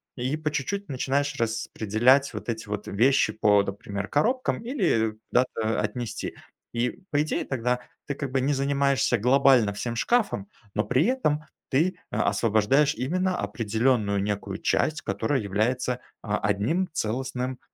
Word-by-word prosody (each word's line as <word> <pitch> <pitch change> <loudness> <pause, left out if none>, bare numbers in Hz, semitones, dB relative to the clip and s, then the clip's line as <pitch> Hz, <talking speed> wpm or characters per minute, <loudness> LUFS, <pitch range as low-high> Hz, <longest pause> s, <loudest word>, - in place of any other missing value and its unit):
и 130 +4 -2
по 155 -1 -2
чуть-чуть 195 +8 -3
начинаешь 140 +1 -1
распределять 115 +3 +2
вот - - -6
эти 110 -2 -3
вот 105 0 -3
вещи 115 +1 +3
по, 105 -1 +4
например, 100 0 -5
коробкам, 240 - 0
или, 185 - +1
э, - - -7 0.2
куда-то 115 -4 +1
отнести. 110 +2 -4 0.4
И, 125 +11 -1
по 145 -1 +2
идее, 155 - -2
тогда 125 -1 -1 0.3
ты, 145 - -2
как 135 -2 -5
бы, 135 - +1
не 140 +3 +1
занимаешься 140 0 +2
глобально 125 -2 +4
всем 115 +3 -4
шкафом, 200 - +1 0.3
но 105 - +2
при 125 +8 +2
этом 155 - +1 0.3
ты, 170 +7 +1
э, - - -4
освобождаешь 120 +7 +3
именно 180 +8 0
определенную 110 -2 0
некую 100 -1 -3
часть, 155 0 +1
которая 140 -5 -1
является, 120 +5 0 0.2
а, 105 -1 -1
одним 105 - 0
целостным 125 +1 -2
125 Hz, 145 wpm, -26 LUFS, 110-145 Hz, 0.4 s, по